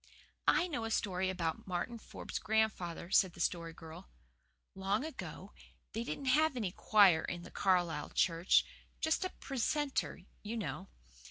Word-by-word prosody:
"I 355 Hz, -, +4 dB
know 290 Hz, -9 st, -3 dB
a -, -, -2 dB
story 190 Hz, -4 st, 0 dB
about 170 Hz, -3 st, -2 dB
Martin 190 Hz, +6 st, -3 dB
Forbes' -, -, -6 dB
grandfather," 215 Hz, -6 st, 0 dB
said 190 Hz, -3 st, +4 dB
the -, -, -14 dB
Story 170 Hz, -1 st, -1 dB
Girl. 160 Hz, -, -11 dB, 0.6 s
"Long 195 Hz, +7 st, 0 dB
ago 320 Hz, -, -7 dB, 0.4 s
they 225 Hz, +1 st, -2 dB
didn't 275 Hz, +3 st, -5 dB
have 295 Hz, +2 st, +3 dB
any 205 Hz, -7 st, -1 dB
choir 195 Hz, -5 st, +5 dB
in 175 Hz, -1 st, -4 dB
the -, -, -11 dB
Carlisle 175 Hz, -5 st, +1 dB
church 170 Hz, +1 st, +4 dB, 0.3 s
just 320 Hz, +3 st, +1 dB
a 370 Hz, -, -1 dB
precentor 275 Hz, -, -1 dB, 0.2 s
you 220 Hz, +3 st, -4 dB
know. 165 Hz, -, -4 dB
195 Hz, 150 wpm, -34 LUFS, 175-235 Hz, 0.6 s, choir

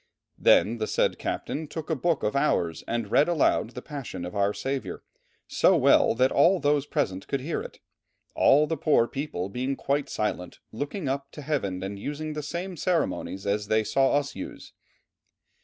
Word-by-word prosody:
Then 115 Hz, +2 st, +4 dB
the 110 Hz, -, -1 dB
said -, -, +1 dB
captain 155 Hz, +1 st, -3 dB
took 160 Hz, +2 st, -6 dB
a -, -, +2 dB
book 165 Hz, +2 st, 0 dB
of 105 Hz, -, 0 dB
Hours 90 Hz, -, +1 dB
and 115 Hz, -3 st, -2 dB
read 150 Hz, -, +4 dB
aloud 145 Hz, -7 st, +1 dB
the 125 Hz, -, -7 dB
Passion 135 Hz, -11 st, -6 dB
of 90 Hz, -, -7 dB
our 100 Hz, 0 st, +2 dB
Saviour, 130 Hz, -5 st, -4 dB, 0.4 s
so -, -, +3 dB
well -, -, +4 dB
that 130 Hz, +2 st, +3 dB
all 175 Hz, +6 st, +4 dB
those 145 Hz, -1 st, +1 dB
present 95 Hz, -, -2 dB
could 140 Hz, -, -1 dB
hear 155 Hz, +5 st, -2 dB
it, -, -, -9 dB, 0.6 s
all 150 Hz, +3 st, +5 dB
the 160 Hz, +1 st, -2 dB
poor 140 Hz, -5 st, +3 dB
people 135 Hz, -11 st, -4 dB
being 130 Hz, +7 st, -2 dB
quite 140 Hz, +1 st, -1 dB
silent, 90 Hz, -4 st, -3 dB
looking 145 Hz, -, -4 dB
up 140 Hz, +1 st, -2 dB
to 150 Hz, -, -8 dB
heaven 100 Hz, -11 st, -2 dB
and 100 Hz, +1 st, -5 dB
using 150 Hz, +6 st, -4 dB
the 150 Hz, -, -4 dB
same 175 Hz, +5 st, -5 dB
ceremonies 165 Hz, -, -1 dB
as 105 Hz, +1 st, -1 dB
they 110 Hz, +1 st, +2 dB
saw 135 Hz, +4 st, +2 dB
us 145 Hz, 0 st, -1 dB
use." -, -, -8 dB
135 Hz, 180 wpm, -26 LUFS, 105-150 Hz, 0.6 s, all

